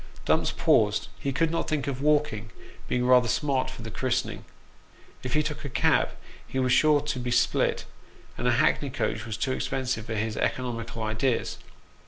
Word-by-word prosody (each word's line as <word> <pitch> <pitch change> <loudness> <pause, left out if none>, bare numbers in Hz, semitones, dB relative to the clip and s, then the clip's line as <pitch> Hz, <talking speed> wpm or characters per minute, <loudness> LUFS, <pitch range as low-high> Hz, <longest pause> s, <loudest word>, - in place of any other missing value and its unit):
Dumps - - +2
paused; - - +2
he 140 - -2
could 160 +5 +1
not 165 - -1
think 150 -4 -1
of 135 -2 -3
walking, 145 -8 +1 0.4
being 125 0 0
rather 125 -1 +5
smart 135 0 0
for 130 -3 -9
the 115 - -6
christening. 130 +3 -2 0.8
If 125 +1 -3
he 155 - +3
took 150 0 -4
a 140 - -4
cab - - +2 0.4
he - - -5
was 130 -1 +2
sure 150 +3 +5
to 145 -3 -3
be 125 0 -3
spilt, 120 0 +1 0.5
and - - -2
a - - +4
hackney - - +2
coach 110 +1 -2
was 110 0 -4
too 130 - -1
expensive 130 -4 -2
for 115 - -3
his 110 +1 -2
economical 115 -2 -2
ideas. 110 +3 -1
130 Hz, 180 wpm, -27 LUFS, 115-140 Hz, 0.8 s, rather